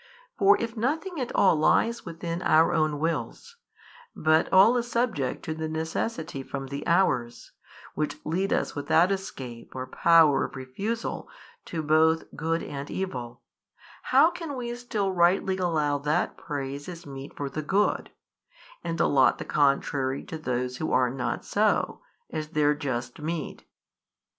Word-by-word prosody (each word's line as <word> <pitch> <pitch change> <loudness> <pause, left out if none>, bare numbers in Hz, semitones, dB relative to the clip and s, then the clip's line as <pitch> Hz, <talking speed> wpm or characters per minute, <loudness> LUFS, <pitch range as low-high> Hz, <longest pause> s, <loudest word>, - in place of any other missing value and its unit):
For 395 +1 +5
if 230 0 -3
nothing 300 - -2
at 245 - -3
all 190 - +5
lies 225 +8 +2
within 170 +1 -4
our 160 -1 +4
own 155 -2 +1
wills, 165 - -3 0.6
but 155 +1 +2
all 195 +6 +7
is 240 0 -2
subject 225 - -1
to 155 - -2
the 160 0 -4
necessity 160 -1 -3
from 135 0 -6
the 140 +1 -5
hours, 130 -10 +1 0.4
which 150 -1 -2
lead 185 +5 -1
us - - 0
without 160 +5 +3
escape 130 -13 -6
or 130 0 -4
power 160 +1 +4
of - - -9
refusal 195 - -4 0.4
to 160 -2 -4
both 160 +1 +3
[good 165 +1 -1
and 140 0 -6
evil], 125 -11 -5 0.6
how 330 - +5
can 335 -5 -6
we 240 -2 -4
still 220 -5 -2
rightly 185 +1 +2
allow 155 -5 +1
that 150 +2 0
praise 140 -2 -5
is 175 -1 -8
meet 135 0 -9
for 145 - -3
the 155 +3 -4
good, 195 +7 +1 0.7
and 165 -1 -3
allot 135 -2 +4
the - - -6
contrary 140 -2 +1
to 160 - -7
those 125 -3 -2
who 155 - -3
are 125 -1 +3
not 130 -1 -3
so, 210 +1 +1 0.3
as 155 -1 -3
their 150 -2 +2
just 130 -3 -4
meed? 160 0 -4
160 Hz, 150 wpm, -27 LUFS, 140-190 Hz, 0.7 s, all